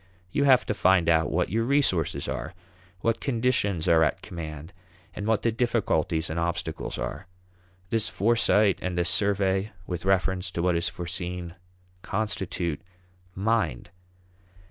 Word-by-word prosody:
You 140 Hz, -, +1 dB
have 130 Hz, -2 st, +5 dB
to -, -, -1 dB
find 95 Hz, -4 st, +3 dB
out 80 Hz, -2 st, +3 dB
what -, -, 0 dB
your 115 Hz, +2 st, +1 dB
resources 125 Hz, -, +1 dB
are, 80 Hz, +3 st, -4 dB, 0.5 s
what 115 Hz, 0 st, +1 dB
conditions 115 Hz, -, 0 dB
are 80 Hz, -1 st, +5 dB
at 75 Hz, -, 0 dB
command, 80 Hz, 0 st, -7 dB, 0.4 s
and 105 Hz, -, -4 dB
what 110 Hz, -1 st, +1 dB
the 115 Hz, -, +2 dB
difficulties 105 Hz, -9 st, 0 dB
and 80 Hz, +2 st, -3 dB
obstacles 85 Hz, -1 st, -3 dB
are. 80 Hz, +7 st, -5 dB, 0.6 s
This 110 Hz, -1 st, +1 dB
foresight 110 Hz, -2 st, +3 dB
and 90 Hz, -1 st, -3 dB
this 85 Hz, -1 st, +2 dB
survey 100 Hz, 0 st, +1 dB
with 90 Hz, -2 st, -4 dB
reference 95 Hz, 0 st, +1 dB
to 85 Hz, -, -2 dB
what 90 Hz, -1 st, +2 dB
is 85 Hz, -, 0 dB
foreseen 90 Hz, -1 st, -5 dB, 0.5 s
constitute 95 Hz, -7 st, -2 dB, 0.5 s
mind. 105 Hz, -, 0 dB
95 Hz, 140 wpm, -26 LUFS, 85-110 Hz, 0.6 s, have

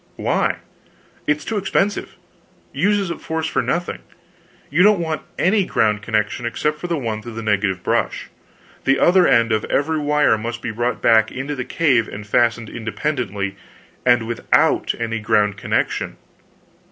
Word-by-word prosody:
"Why?" -, -, 0 dB, 0.7 s
"It's 150 Hz, 0 st, 0 dB
too 220 Hz, -, -2 dB
expensive 200 Hz, +1 st, -1 dB, 0.6 s
uses 200 Hz, -3 st, +1 dB
up -, -, -6 dB
force 160 Hz, 0 st, -3 dB
for -, -, 0 dB
nothing. 175 Hz, +1 st, -2 dB, 0.7 s
You 160 Hz, +5 st, +3 dB
don't 205 Hz, 0 st, +5 dB
want 160 Hz, -2 st, -2 dB, 0.2 s
any 200 Hz, +3 st, +3 dB
ground 105 Hz, -, +1 dB
connection 110 Hz, +2 st, -1 dB
except 150 Hz, +6 st, -2 dB
the 175 Hz, -2 st, -1 dB
one 110 Hz, -5 st, -3 dB
through 120 Hz, 0 st, -9 dB
the 115 Hz, -, -5 dB
negative 100 Hz, -3 st, 0 dB
brush. -, -, -1 dB, 0.5 s
The 135 Hz, 0 st, +4 dB
other 180 Hz, 0 st, +5 dB
end 115 Hz, -1 st, +4 dB
of 110 Hz, -1 st, +1 dB
every 155 Hz, +3 st, 0 dB
wire 150 Hz, -6 st, +2 dB
must 120 Hz, +1 st, -5 dB
be -, -, -2 dB
brought 120 Hz, +2 st, -2 dB
back 110 Hz, -1 st, +4 dB
into 135 Hz, +3 st, -4 dB
the 130 Hz, -3 st, -4 dB
cave 130 Hz, -9 st, +2 dB
and 105 Hz, +1 st, -8 dB
fastened 115 Hz, +1 st, +1 dB
independently, 110 Hz, -5 st, -3 dB, 0.5 s
and 120 Hz, -2 st, +3 dB
without 115 Hz, 0 st, +1 dB
any 115 Hz, -1 st, -2 dB
ground 105 Hz, -2 st, +2 dB
connection. -, -, -1 dB
120 Hz, 155 wpm, -20 LUFS, 110-155 Hz, 0.7 s, don't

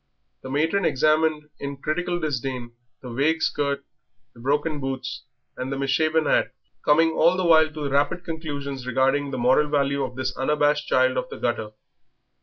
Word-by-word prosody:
The 130 Hz, -, -8 dB
matron 160 Hz, +8 st, +1 dB
examined 155 Hz, +1 st, +2 dB, 0.2 s
in 140 Hz, 0 st, -5 dB
critical 175 Hz, +5 st, -2 dB
disdain 130 Hz, -5 st, -3 dB, 0.3 s
the 125 Hz, -, -7 dB
vague 155 Hz, +6 st, +1 dB
skirt, 140 Hz, -1 st, -1 dB, 0.5 s
the -, -, -17 dB
broken 145 Hz, +4 st, 0 dB
boots, 135 Hz, -1 st, -5 dB, 0.3 s
and 130 Hz, +1 st, -4 dB
the 135 Hz, -, -2 dB
misshapen 155 Hz, +3 st, +1 dB
hat, -, -, +1 dB, 0.3 s
coming 160 Hz, +2 st, +4 dB
all 170 Hz, +3 st, +3 dB
the 185 Hz, -, 0 dB
while 160 Hz, -2 st, +6 dB
to 155 Hz, -2 st, -5 dB
rapid 145 Hz, +5 st, +1 dB
conclusions 145 Hz, -6 st, -5 dB
regarding 135 Hz, +3 st, +1 dB
the 130 Hz, -, -4 dB
moral 130 Hz, +5 st, +3 dB
value 140 Hz, -1 st, +1 dB
of 125 Hz, -, -5 dB
this 130 Hz, 0 st, -3 dB
unabashed 150 Hz, +1 st, +1 dB
child 130 Hz, 0 st, +3 dB
of 125 Hz, -, -2 dB
the -, -, -7 dB
gutter. 110 Hz, -3 st, -2 dB
145 Hz, 165 wpm, -24 LUFS, 130-155 Hz, 0.5 s, while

